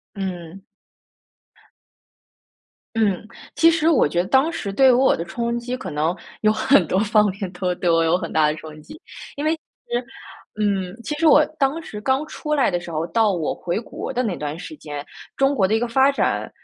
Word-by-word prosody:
嗯。 185 -1 -6 2.3
嗯， 210 -3 +1 0.3
其 330 - +5
实 325 -1 +2
我 305 - +4
觉 175 +4 +1
得 185 - -8
当 270 +4 +3
时 215 -12 -4
对 265 +6 +5
于 - - +6
我 260 +2 +4
的 170 - -4
冲 235 +7 -2
击 245 +1 -4
可 - - -7
能 155 +4 -1 0.2
有 215 0 +3
很 265 +6 +4
多 185 - 0
方 210 0 +3
面 195 -1 -5
都 180 0 -2
对 175 - -1
我 165 0 +4
有 165 +2 +3
很 170 -2 -5
大 155 -1 +3
的 150 - +1
冲 155 -1 -11
击。 310 - -13 0.4
因 290 - -4
为 310 +1 +2
其 320 - -12 0.3
实， 240 +1 0 0.6
嗯， 195 -2 -1
其 300 - -3
实 330 - +2
我 300 0 +7
当 280 +3 +1
时 210 -9 -8
刚 265 +6 0
出 300 0 -3
来 275 -4 +3
的 175 - -1
时 175 - -9
候， 160 +1 -2
到 220 -3 +2
我 160 -3 -2
回 175 +2 -3
国 - - -6
的 250 - 0
那 215 -7 -2
段 150 +2 -5
时 315 - -8
间， 145 - -7 0.3
中 270 +1 +2
国 190 -8 +2
的 220 - +1
一 - - +3
个 240 - -1
发 265 +4 +4
展， 280 - -1
210 Hz, 225 characters per minute, -22 LUFS, 175-270 Hz, 2.3 s, 我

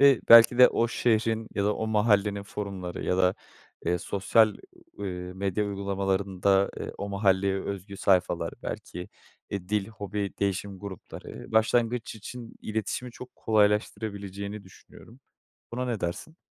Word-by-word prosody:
Eee, 140 -3 +6
belki 115 +1 +9
de 125 - +10
o 115 - +1
şehrin 115 -1 +1
ya 100 - 0
da 105 0 +2
o 110 - -2
mahallenin 105 -2 +2
forumları 100 -3 -5
ya 90 - +1
da, 90 0 +3 0.5
eee, 90 +1 +2
sosyal, 105 +3 +3 0.4
eee, 100 - -4 0.3
medya 100 +2 -1
uygulamalarında, 100 -1 +1
eee, - - -5
o 100 - -4
mahalleye 100 -1 +2
özgü 100 0 -6
sayfalar, 95 -2 +1
belki, 90 +1 -6 0.4
eee, 100 -2 -5
dil, 105 -2 0
hobi, 100 -2 -4
değişim 100 0 -1
grupları, 100 +2 -9
başlangıç 115 +1 +2
için 115 +2 -9
iletişimi 110 +3 -3
çok 125 +1 -11
kolaylaştırabileceğini 105 -1 0
düşünüyorum. 115 +6 -16 0.5
Buna 125 +1 -2
ne 115 -5 -2
dersin? 100 - -4
100 Hz, 135 wpm, -27 LUFS, 95-110 Hz, 0.5 s, de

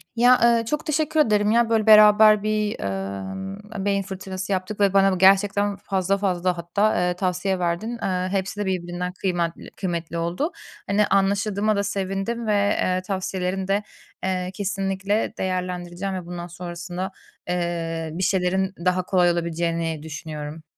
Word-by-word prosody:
ya, 245 +2 +5
eee, 235 -1 +4
çok 300 +8 -2
teşekkür 310 0 0
ederim 210 -5 +3
ya 235 0 +3
böyle 220 -1 +2
beraber 215 0 +7
bir, 215 -1 -1
emm, 100 - -5
beyin 200 -1 +1
fırtınası 190 0 -6
yaptık 190 +2 -2
ve 200 -1 +3
bana 195 -1 +4
gerçekten 200 +2 +4
fazla 195 0 0
fazla 180 -2 0
hatta, 200 +6 +1
eee, 180 0 +1
tavsiye 185 +1 -1
verdin. 180 +7 -2
Eee, 185 0 -1
hepsi 195 +1 -2
de - - -1
birbirinden 180 -1 -3
kıymatli 175 -3 -2
kıymetli 170 -3 -3
oldu. 175 - -1 0.4
Hani, 205 +1 +2
anlaşıldığıma 200 +2 +1
da 200 - 0
sevindim 200 +4 -3
ve, - - +2 0.3
eee, 185 0 +1
tavsiyelerini 185 0 -3
de, 200 +1 +1 0.4
eee, 185 -1 -1
kesinlikle 195 +1 -1
değerlendireceğim 180 0 -3
ve 180 -2 -5
bundan 175 0 -6
sonrasında, 175 +2 -6 0.4
eee, 165 -2 -2
bir 185 +3 -3
şeylerin 190 +1 +1
daha 180 0 +2
kolay 180 -1 +3
olabileceğini 165 -2 -2
düşünüyorum. 155 0 -7
190 Hz, 145 wpm, -23 LUFS, 175-205 Hz, 0.4 s, beraber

